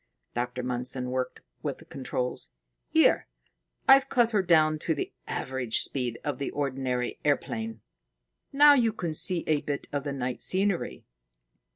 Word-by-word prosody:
Dr. 125 +1 -3
Mundson 125 0 -1
worked 130 0 -3 0.2
with - - -3
the - - -16
controls. 125 -1 -3 0.4
"Here, - - +4 0.6
I've 270 0 +7
cut 240 -2 +3
her 210 -3 +3
down 155 -3 +4
to 160 +1 0
the - - -4
average 130 -3 0
speed 125 -4 -2
of 145 -3 -3
the 140 - -2
ordinary 130 -3 -2
airplane. 225 +10 -1 0.7
Now 290 +1 +8
you 235 -5 +3
can 175 -6 -3
see 175 +2 -1
a 150 -2 +2
bit 145 -1 -3
of 145 -1 -1
the 145 - -3
night 130 -2 -3
scenery." 195 -1 0
145 Hz, 150 wpm, -28 LUFS, 125-190 Hz, 0.7 s, Now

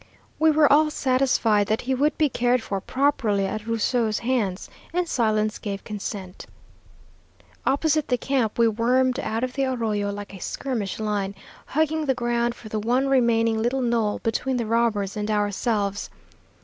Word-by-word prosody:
We 315 0 +5
were 300 -2 +5
all 305 +1 +5
satisfied 255 -7 +2
that 220 - 0
he 265 +2 -1
would 290 +4 +1
be 310 - +3
cared 245 -2 +1
for 195 -2 -3
properly 230 -6 +1
at 215 +2 -4
Rusou's 230 -1 +1
hands, 230 -7 -1 0.2
and 355 +1 0
silence 215 -5 0
gave 200 -2 -5
consent. 200 -3 -6 1.2
"Opposite 300 +2 +2
the 250 - +1
camp 250 -5 -1
we 235 -1 +5
wormed 250 +4 +2
out 225 -2 -2
of 255 0 -2
the 275 0 0
arroyo 220 -6 -1
like 205 0 -7
a 190 - -9
skirmish 230 -8 -3
line, 205 -2 -2 0.3
hugging 315 +1 0
the 265 - +2
ground 240 -1 0
for 225 - -12
the 215 0 -3
one 250 +5 +1
remaining 230 -4 +2
little 255 +3 0
knoll 230 -3 +1
between 255 +3 -1
the 235 - -1
robbers 220 -3 0
and 210 0 -3
ourselves. 205 -1 -1
235 Hz, 160 wpm, -24 LUFS, 210-260 Hz, 1.2 s, We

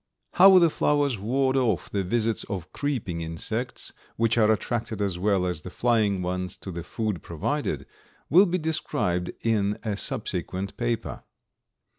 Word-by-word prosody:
How 190 +1 +8
the 170 -3 +5
flowers 145 -7 +1
ward 130 +6 +1
off 110 - +1
the 100 -1 0
visits 115 +3 0
of 90 -2 -6
creeping 120 -13 -2
insects, 110 +10 -3 0.2
which 115 0 +2
are 110 -2 +4
attracted 110 0 -2
as 95 -4 -1
well 95 -1 +2
as 90 -4 -2
the 90 - -8
flying 105 -3 +1
ones 90 0 -3
to 95 - -7
the 85 0 -5
food 105 0 -3
provided, - - -2 0.4
will 185 +6 +6
be 180 +1 0
described 145 - -1
in 105 -3 +1
a 110 -3 -1
subsequent 100 - -3
paper. 120 -1 -2
110 Hz, 150 wpm, -26 LUFS, 90-125 Hz, 0.4 s, How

